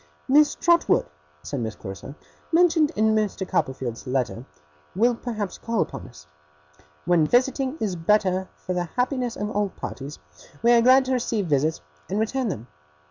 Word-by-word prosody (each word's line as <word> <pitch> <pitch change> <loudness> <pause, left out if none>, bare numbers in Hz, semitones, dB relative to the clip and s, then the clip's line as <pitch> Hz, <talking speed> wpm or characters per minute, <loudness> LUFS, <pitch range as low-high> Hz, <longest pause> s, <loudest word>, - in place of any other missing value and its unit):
'Miss 295 +2 +5
Trotwood,' 340 0 +3 0.4
said 140 - -4
Miss 110 -2 -3
Clarissa, 95 +8 -8 0.4
'mentioned 330 -3 +4
in 220 +1 +3
Mr. 210 -3 -1
Copperfield's 130 -6 -2
letter, 125 -2 -2 0.5
will 235 +5 +3
perhaps 220 -4 -5
call 230 -2 -2
upon - - -3
us. 75 0 -15 0.8
When 170 -3 +3
visiting 260 - +1
is 200 -4 -1
better 185 +1 +1
for 185 - -5
the 175 -1 -1
happiness 250 -1 -1
of 210 +1 -3
all 205 -1 0
parties, 140 -4 -7 0.5
we 235 - +5
are 235 -1 +6
glad 260 +2 +6
to 260 - 0
receive 230 -5 0
visits, 155 0 +1 0.3
and 200 +3 -1
return 245 +3 0
them. 120 - -4
210 Hz, 155 wpm, -24 LUFS, 160-250 Hz, 0.8 s, are